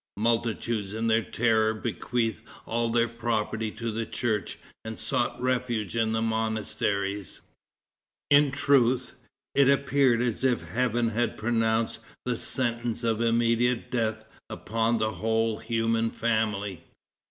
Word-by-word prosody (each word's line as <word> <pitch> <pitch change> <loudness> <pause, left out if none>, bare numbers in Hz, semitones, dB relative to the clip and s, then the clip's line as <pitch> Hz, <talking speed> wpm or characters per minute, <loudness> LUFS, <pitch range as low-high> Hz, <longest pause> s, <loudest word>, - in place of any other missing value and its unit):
Multitudes 115 -2 0
in 115 +1 -2
their 115 0 +3
terror 110 -1 +1
bequeathed 115 -2 -2 0.2
all 115 0 -1
their 115 0 +3
property 110 -2 -2
to 115 +1 -4
the 115 +1 -2
church, 110 -1 -2 0.3
and - - -6
sought - - -1
refuge 120 -5 -1
in 115 -1 +1
the 110 0 0
monasteries. 105 -3 -2 0.9
It 145 -1 +6
truth, 130 -3 +2 0.4
it 140 -1 +5
appeared 140 -3 +3
as 120 0 -1
if 130 -2 +2
Heaven 120 -1 +1
had 120 +2 -1
pronounced 115 0 0 0.3
the 125 -1 0
sentence 120 -1 0
of 115 -1 +1
immediate 115 +1 +1
death 110 -2 -1 0.2
upon 115 +3 0
the 110 0 0
whole 110 +3 0
human 115 0 0
family. 110 -5 -1
115 Hz, 125 wpm, -27 LUFS, 110-120 Hz, 0.9 s, It